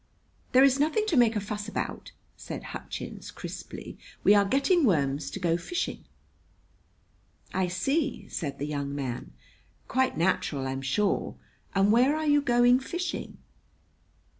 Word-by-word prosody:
"There 260 +1 +7
is 275 0 +4
nothing 315 +9 +2
to 330 - +1
make 235 -3 +5
a - - +1
fuss 210 +1 -5
about!" 210 - -4 0.2
said - - -7
Hutchins - - -7
crisply. - - -8 0.2
"We 205 - +7
are 200 -1 +5
getting 275 - +3
worms 140 - +1
to 195 - -6
go 170 -2 +1
fishing." 345 - -4 1.5
"I 185 -1 +1
see," 275 - -1
said 140 -5 -4
the 145 - -3
young 140 -1 -3
man. 130 -4 -4 0.6
"Quite 260 0 +1
natural, 155 -5 0
I'm 135 0 -3
sure. 165 +10 0 0.4
And 195 +1 +4
where 255 +6 +4
are 310 0 -2
you 290 -1 +4
going 245 -1 +4
fishing?" 350 +7 -4
210 Hz, 140 wpm, -28 LUFS, -, 1.5 s, There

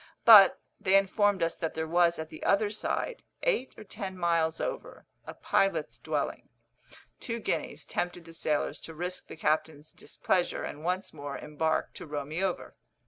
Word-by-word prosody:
But 210 -4 +9 0.2
they 190 +1 +3
informed 195 -1 +2
us 165 - 0
that 160 - -3
there 160 0 -2
was 170 +1 +3
at 160 0 -6
the 155 - -11
other 205 +1 +2
side, 450 - -3 0.2
eight 460 - 0
or 220 - -9
ten 195 -2 -6
miles 165 -2 +1
over, - - -5 0.2
a - - -7
pilot's 195 0 0
dwelling. - - -3 0.7
Two 230 -1 -4
guineas - - -3
tempted 175 -1 -3
the 165 - -12
sailors 150 -2 -1
to 160 - -10
risk 180 +3 -5
the - - -9
captain's 155 0 -1
displeasure, 180 -1 -1
and 150 - -6
once 180 +3 -2
more 145 -2 -6
embark 155 +1 -1
to - - -9
row 145 -1 -4
me 160 +6 -3
over. 190 -2 -3
175 Hz, 170 wpm, -29 LUFS, 160-195 Hz, 0.7 s, But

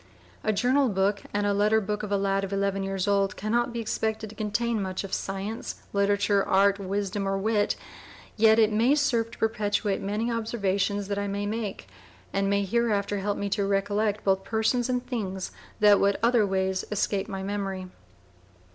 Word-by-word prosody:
A - - +2
Journal 255 +6 +2
Book 200 0 +1
and 205 0 0
a 205 - +2
letter 210 +2 +3
Book 210 0 -3
of 210 - -5
a 200 - +3
Lad 195 0 0
of 195 - -4
Eleven 195 0 0
years 195 0 -2
old 200 -1 +1
Can 215 +2 -3
not 240 +1 +1
be 235 - -4
expected 220 -1 -2
to - - -13
Contain 220 +1 -1
much 190 0 -3
of 195 - -7
Science, 195 +3 -3 0.2
Literature, 200 0 +2
arts, 200 +1 +3
wisdom, 200 0 -2
or 195 0 0
wit, 205 +1 +1 0.6
yet 220 0 +5
it 220 -1 +4
may 235 +7 +4
serve 240 -6 +1
to - - -13
perpetuate 205 -2 0
many 210 +4 -1
observations 205 -3 -1
that 200 0 -2
I 200 - -2
may 200 +1 -2
make, 210 - -4 0.5
and 195 0 +1
may 200 0 +1
hereafter 205 -2 0
help 205 +1 -1
me 200 - -2
to 200 +1 0
recollect 205 +1 0
both 190 -1 +2
persons 225 +4 0
and 250 -1 -1
things 195 -7 -4 0.3
that 205 -1 +7
would 200 0 +2
other 235 -3 +4
ways 190 -1 0
escape 200 -1 0
my 195 -2 -5
memory. 195 -2 -3
205 Hz, 185 wpm, -27 LUFS, 195-220 Hz, 0.6 s, that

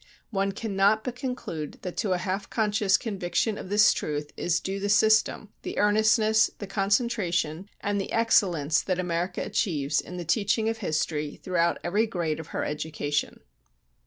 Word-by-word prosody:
One 195 -1 0
cannot 205 +1 +1
but 250 -2 -4
conclude 250 - -5
that 180 - -5
to 200 -5 +1
a - - +1
half 190 +2 -3
conscious 205 -3 +2
conviction 205 +1 -1
of - - -8
this 210 +1 +5
truth 150 -1 -4
is 175 0 0
due 195 +2 -4
the 200 +1 -2
system, 215 0 +3
the - - -6
earnestness, 220 +1 +4
the 205 - -6
concentration, 195 -4 0
and 200 0 0
the - - -6
excellence 175 -10 +3
that 185 -2 -1
America 180 0 -2
achieves 145 -7 0
in 180 - -9
the 175 - -5
teaching 210 +4 +1
of 225 0 -3
history 155 -5 -2
throughout 170 -2 +1
every 210 +6 +1
grade 170 -7 -2
of 160 - -8
her - - -3
education." 150 -1 -3
195 Hz, 160 wpm, -27 LUFS, 170-215 Hz, -, this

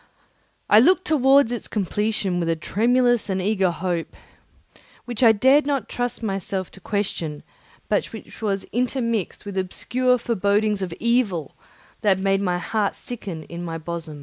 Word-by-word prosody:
I 210 - +7
looked 365 +9 +4
towards 275 -5 +4
its 240 - -4
completion 205 -2 -1
with 170 -1 -1
a 165 - +2
tremulous 240 +7 +2
and 190 -1 0
eager 190 -1 +1
hope, 175 -1 -3 0.9
which 240 -1 -5
I 230 -3 +8
dared 265 +7 +4
not 275 -7 -1
trust 245 -1 -3
myself 195 -2 -3
to - - -14
question 175 -7 -3 0.4
but - - +1
which - - -11
was 200 -3 -1
intermixed 230 -5 -1
with 200 -1 -3
obscure 250 +7 0
forebodings 210 -2 +1
of 185 -2 -3
evil 225 - 0 0.5
that 200 -3 +3
made 195 0 +1
my 180 -3 0
heart 205 +3 -1
sicken 190 -10 -7
210 Hz, 140 wpm, -23 LUFS, 190-245 Hz, 0.9 s, I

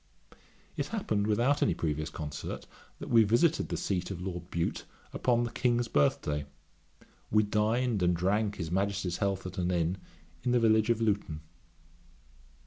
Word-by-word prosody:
It - - -1
happened 110 - -1
without 120 +7 +2
any - - +2
previous 75 -2 -2
concert, 75 -2 -6 0.3
that - - -8
we 115 -1 +7
visited 120 +10 +2
the - - -2
seat 90 -3 -2
of 95 -3 -5
Lord 90 -1 -5
Bute 85 -1 -2 0.3
upon 120 -1 +2
the 120 - -3
King's 120 -1 +1
birthday; 75 -2 +1 0.8
we 105 0 +4
dined 110 +2 +1
and 90 0 +3
drank 100 +4 +1
his 80 -4 -5
Majesty's 95 -1 0
health 100 -2 -1
at 95 +1 -5
an 90 0 0
inn, 90 +1 0 0.4
in 125 0 0
the 125 - +4
village 110 -1 +3
of 115 -1 +2
Luton. 100 -8 0
100 Hz, 155 wpm, -30 LUFS, 90-115 Hz, 0.8 s, we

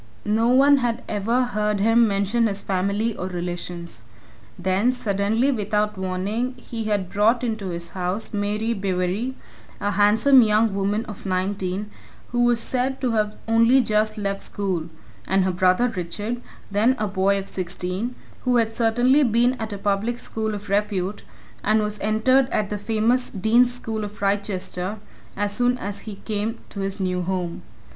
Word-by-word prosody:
No 220 +2 +2
one 275 +3 +6
had 245 -1 -1
ever 225 +5 +1
heard 210 -4 -1
him 225 +3 +4
mention 205 +3 +1
his 200 -1 -3
family 200 +4 0
or 185 - -4
relations; 175 -1 -5 0.6
then, 190 +7 +1
suddenly, 220 +2 +1
without 210 -2 0
warning, 195 +7 -2
he 230 -2 -6
had 205 -4 -1
brought 225 +5 +3
into 220 -4 -2
his 170 -1 -5
house 185 +5 -2
Mary 210 +2 -1
Bewery, 195 +5 -1 0.4
a 205 - 0
handsome 215 +7 +5
young 215 -1 +3
woman 200 +3 0
of 210 -3 -8
nineteen, 190 +2 -2 0.4
who 240 0 +2
was 240 -1 +3
said 260 +2 0
to 255 -3 0
have 215 -1 0
only 230 +3 +5
just 215 -2 +1
left 200 -1 -2
school, 185 -5 -2 0.4
and 190 0 +3
her 185 - +1
brother 185 +6 +3
Richard, 210 +4 -4 0.3
then 220 +6 +3
a 215 - -1
boy 195 0 +2
of 195 0 -5
sixteen, 185 +6 -3 0.3
who 250 -1 +2
had 225 -2 +2
certainly 245 +5 +3
been 240 -1 +3
at 220 -1 -4
a 200 - -4
public 205 +4 0
school 220 -2 -3
of 205 0 -8
repute 200 -1 -1 0.4
and 215 +1 +3
was 210 -1 -2
entered 250 +5 +3
at 210 -1 -1
the 210 - -1
famous 225 +4 +1
Dean's 230 +5 +3
School 225 -3 -4
of 210 0 -7
Wrychester 195 -1 -2 0.4
as 205 0 -1
soon 245 +2 +2
as 200 -2 -5
he 210 0 -7
came 220 +1 -2
to 200 - -8
his 195 +1 -3
new 180 -1 -1
home. 180 -1 -3
210 Hz, 165 wpm, -23 LUFS, 195-230 Hz, 0.6 s, one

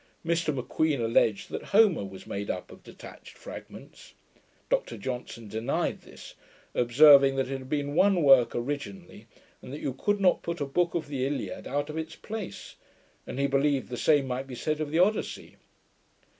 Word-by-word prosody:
Mr 170 -1 +1
M'Queen 145 +2 -1
alledged 115 -2 +1
that - - -4
Homer 200 - +4
was 95 -1 -9
made 100 +1 -5
up 90 - -4
of - - -14
detached - - -13
fragments. - - -11 0.5
Dr 115 - -1
Johnson 115 0 -6
denied 110 +6 -2
this; - - -13 0.4
observing, 135 +2 +6
that 135 -1 -1
it 135 - -3
had 130 0 -11
been 145 -1 -2
one 190 +1 +3
work 135 -4 +6
originally, 145 - -5 0.3
and - - -10
that 145 - -6
you 135 - -3
could 205 +10 0
not 185 -2 +3
put 170 0 -4
a 145 - -1
book 170 +5 0
of 160 -3 -2
the 140 -3 -3
Iliad 145 0 -4
out 145 +2 -2
of 160 - -4
its 160 0 -6
place; 215 -2 -8 0.5
and - - -6
he 140 - +2
believed 140 0 +1
the 125 - -4
same 145 +2 +3
might 130 +1 -4
be 130 - -7
said 155 +5 -2
of 155 - -2
the 160 - -1
Odyssey. 195 +5 0
140 Hz, 180 wpm, -28 LUFS, 125-160 Hz, 0.5 s, observing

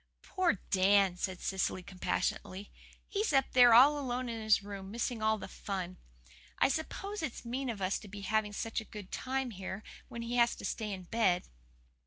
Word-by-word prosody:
"Poor 370 -2 +1 0.2
Dan," 195 -1 +4
said 185 0 -3
Cecily 190 -1 -1
compassionately. 185 +1 -3 0.4
"He's 420 -1 0
up 270 -2 +3
there 245 -1 +8
all 285 +5 +7
alone 250 -2 -2
in 230 -1 -4
his 215 -2 +3
room, 200 -1 -7
missing 235 +1 -2
all 220 0 +2
the - - -7
fun. 185 -2 -5 0.6
I - - +4
suppose 390 +7 -3
it's 270 -5 -5
mean 255 +3 -2
of 205 -4 -4
us 185 +1 0
to 215 - -12
be 200 +1 -8
having 210 +1 0
such 225 +2 -2
a - - -11
good 205 -3 -10
time 260 -1 -2
here, 190 +1 -6 0.2
when 235 0 -6
he 240 +1 -2
has 235 0 +4
to - - -8
stay 215 -2 -3
in 190 -2 -5
bed." 180 -2 +1
220 Hz, 190 wpm, -32 LUFS, 195-245 Hz, 0.6 s, there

